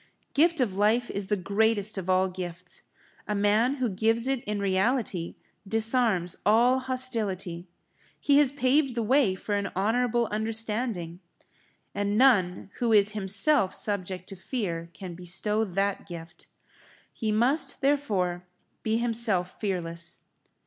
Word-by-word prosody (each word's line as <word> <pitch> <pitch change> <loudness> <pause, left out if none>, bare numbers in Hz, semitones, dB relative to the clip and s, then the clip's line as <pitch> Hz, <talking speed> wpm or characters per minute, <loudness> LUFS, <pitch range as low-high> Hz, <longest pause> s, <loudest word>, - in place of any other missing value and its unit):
Gift 330 +2 +3
of 235 -7 +1
life 215 +5 +2
is 200 -1 -4
the 210 - 0
greatest 210 +2 0
of 190 -2 -5
all 185 0 +3
gifts; 180 -1 -7 0.5
a 210 - -1
man 210 +6 +2
who 260 -3 -1
gives 225 +4 +1
it 270 -2 -1
in 210 0 -2
reality, 195 -2 0 0.3
disarms 220 -5 +2
all 240 +5 +4
hostility. 215 -9 -3 0.5
He 285 0 +4
has 285 -3 +4
paved 270 0 +1
the 235 - 0
way 245 -4 +3
for 205 +2 -5
an 200 -1 0
honourable 235 +4 +1
understanding. 215 -5 -1 0.7
And 205 +1 -1
none 200 -8 +3
who 235 -2 +1
is 205 -1 +4
himself 200 +2 +2
subject 185 -3 -1
to 195 - -7
fear 175 -5 -4
can 180 +3 -8
bestow 195 +5 -1
that 195 +1 -2
gift. 170 -1 -10 0.7
He 220 -1 -2
must, 265 +6 +1
therefore, 200 -11 0 0.3
be 220 0 0
himself 225 -6 0
fearless. 170 -4 -3
210 Hz, 135 wpm, -27 LUFS, 185-240 Hz, 0.7 s, all